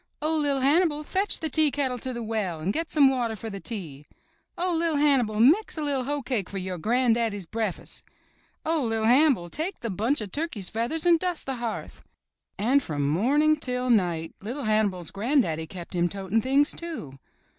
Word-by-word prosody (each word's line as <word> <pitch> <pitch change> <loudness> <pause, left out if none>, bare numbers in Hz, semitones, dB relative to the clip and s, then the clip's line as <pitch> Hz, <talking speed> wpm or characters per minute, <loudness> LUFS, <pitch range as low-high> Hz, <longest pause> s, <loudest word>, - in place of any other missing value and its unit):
'* - - -49
''Oh, 315 +1 +1
LiT 280 -2 0
Hannibal, 300 +1 +3
fetch 390 +6 +2
the 320 - 0
tea 310 0 +3
kettle 265 -3 -2
to 260 - -4
the 235 -1 -5
well 210 -7 -2
and 180 +6 -1
get 330 -1 -2
some 295 -2 +5
water 245 -4 0
for 220 +1 -7
the 200 - -6
tea.'* 160 - -7 0.5
''Oh, 355 0 +1
LiT 330 -2 +1
Hannibal, 260 -8 +2
mix 320 - +4
a 310 - -2
liT 275 -3 -1
hoecake 260 -8 -2
for 200 - -5
your 185 -1 -4
gran'daddy's 230 -2 +1
brea'fus'." 215 0 -4 0.6
"Oh, 320 -1 +1
LiT 225 -3 -1
Hannibal, 245 - +4
take 345 +5 -4
the 230 -3 -3
bunch 225 +10 0
of 210 -4 -6
turkeys' 285 - -3
feathers 240 +10 -1
and 340 -2 +5
dust 360 -2 -2
the 265 -1 -3
hearth." 235 -2 -5 0.6
And 250 +8 +3
from 145 - -2
morning 265 - +3
until 250 -4 0
night 175 -7 +1
LiT 245 +6 -5
Hannibal's 205 -6 0
gran'daddy 200 - 0
kept 175 +1 -9
him 175 -1 +1
toting 195 +3 -1
things, 275 +4 +3
too. 300 - -6
240 Hz, 190 wpm, -26 LUFS, 200-295 Hz, 0.6 s, some